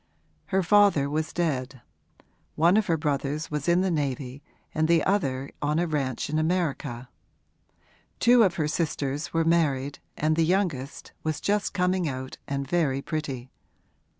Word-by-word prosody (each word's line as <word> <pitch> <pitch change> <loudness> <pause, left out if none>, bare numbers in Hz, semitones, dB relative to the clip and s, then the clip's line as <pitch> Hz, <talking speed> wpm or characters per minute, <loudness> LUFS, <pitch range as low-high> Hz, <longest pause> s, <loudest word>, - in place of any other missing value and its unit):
Her 190 -1 +1
father 200 -6 +4
was 155 +1 -1
dead; 135 -7 -2 0.7
one 170 +4 +4
of 215 0 +2
her 165 -3 +2
brothers 150 0 -2
was 150 0 -3
in 175 +1 +4
the 190 -1 +1
navy 140 -3 -2 0.3
and 155 0 +1
the 165 -1 +4
other 140 -9 0
on 150 +1 0
a 175 - +2
ranch 140 -6 -2
in 155 +1 0
America; 155 -7 -1 1.1
two 240 0 +6
of 190 -6 +3
her 155 -3 0
sisters 150 -2 -2
were 165 0 +1
married 145 -5 +1 0.2
and 155 +1 +1
the 165 - +3
youngest 160 -6 -1
was 155 -2 -2
just 205 0 0
coming 180 -3 +1
out 130 0 -6
and 140 -1 -3
very 140 -4 0
pretty. 135 -5 -4
155 Hz, 150 wpm, -26 LUFS, 140-175 Hz, 1.1 s, two